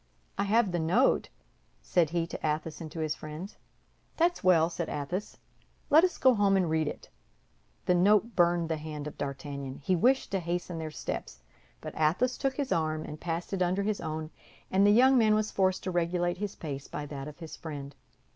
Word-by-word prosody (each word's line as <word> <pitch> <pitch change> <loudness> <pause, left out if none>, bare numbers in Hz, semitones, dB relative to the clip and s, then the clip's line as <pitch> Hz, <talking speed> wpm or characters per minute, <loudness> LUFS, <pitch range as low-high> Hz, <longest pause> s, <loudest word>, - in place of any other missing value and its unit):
"I 200 - 0
have 215 -1 +3
the 175 - -1
note," 160 +1 +2 0.5
said 160 - +1
he 170 0 0
to - - -7
Athos 155 +1 -2
and 155 -2 -7
to 165 - -5
his 155 -1 0
friends. 155 +7 -8 0.6
"That's 345 +1 +2
well," 170 -3 +5
said 170 -1 -4
Athos, 160 +8 -4 0.5
"let 315 +3 +7
us 365 -2 +1
go 260 -1 +5
home 200 -3 +3
and 180 -4 +1
read 160 -1 +1
it." - - -6 0.8
The 180 - +3
note 205 +5 +3
burned 175 -1 +3
the 160 -1 -1
hand 150 -1 -6
of 150 - -6
D'Artagnan. 140 -1 -5
He 180 +6 0
wished 255 +9 +2
to 195 - +1
hasten 175 0 -3
their 160 -1 -4
steps; 60 - -6 0.4
but - - -7
Athos 170 +12 +1
took 270 -1 0
his 280 -2 -3
arm 155 -1 0
and 150 0 -8
passed 170 +2 -3
it 190 - -1
under 185 +2 +1
his 210 0 -1
own, 155 -1 -4 0.4
and 195 +2 +4
the - - +6
young 255 +4 +6
man 215 -2 +4
was 215 0 0
forced 190 -1 +1
to 185 - -2
regulate 175 0 0
his 205 -1 -4
pace 140 -3 -6
by 150 - -5
that 140 -1 -6
of 150 - -9
his 165 -2 -8
friend. 145 -3 -7
175 Hz, 205 wpm, -29 LUFS, 155-200 Hz, 0.8 s, let